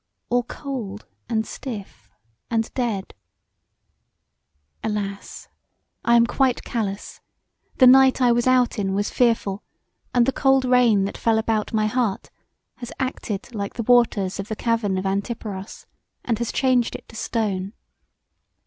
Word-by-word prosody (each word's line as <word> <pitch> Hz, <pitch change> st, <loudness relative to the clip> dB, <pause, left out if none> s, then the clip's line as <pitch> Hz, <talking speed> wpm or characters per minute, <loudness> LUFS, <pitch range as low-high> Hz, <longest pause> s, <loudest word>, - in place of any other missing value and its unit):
All 245 Hz, 0 st, +3 dB
cold, 240 Hz, -6 st, -6 dB, 0.2 s
and 220 Hz, -2 st, 0 dB
stiff, 200 Hz, -, -8 dB, 0.4 s
and 225 Hz, -1 st, -1 dB
dead! 225 Hz, -7 st, -2 dB, 1.7 s
Alas! 200 Hz, -2 st, -4 dB, 0.6 s
I 235 Hz, -, +4 dB
am 235 Hz, 0 st, +6 dB
quite 255 Hz, +1 st, +1 dB
callous: 205 Hz, -4 st, -4 dB, 0.6 s
the 260 Hz, -, +7 dB
night 265 Hz, +1 st, +7 dB
I 250 Hz, -2 st, +4 dB
was 240 Hz, +1 st, +1 dB
out 250 Hz, -3 st, +3 dB
in 195 Hz, -1 st, -1 dB
was 205 Hz, +1 st, -1 dB
fearful 225 Hz, -5 st, +1 dB, 0.5 s
and 245 Hz, -1 st, +3 dB
the 270 Hz, -, +2 dB
cold 270 Hz, -1 st, +3 dB
rain 245 Hz, -5 st, +4 dB
that 195 Hz, -, -4 dB
fell 225 Hz, -1 st, +2 dB
about 220 Hz, -1 st, 0 dB
my 215 Hz, -1 st, +1 dB
heart 225 Hz, -3 st, -1 dB, 0.5 s
has 240 Hz, -1 st, -8 dB
acted 240 Hz, -4 st, -4 dB
like 200 Hz, -2 st, -4 dB
the 230 Hz, -, -3 dB
waters 220 Hz, -6 st, +2 dB
of 195 Hz, -, -4 dB
the 220 Hz, -, -4 dB
cavern 225 Hz, -4 st, 0 dB
of 185 Hz, -, -3 dB
Antiparos 200 Hz, 0 st, -4 dB, 0.4 s
and 230 Hz, -3 st, 0 dB
has 235 Hz, -, -2 dB
changed 255 Hz, -3 st, +1 dB
it -, -, -10 dB
to -, -, -13 dB
stone. 205 Hz, -4 st, -2 dB
225 Hz, 140 wpm, -23 LUFS, 200-245 Hz, 1.7 s, the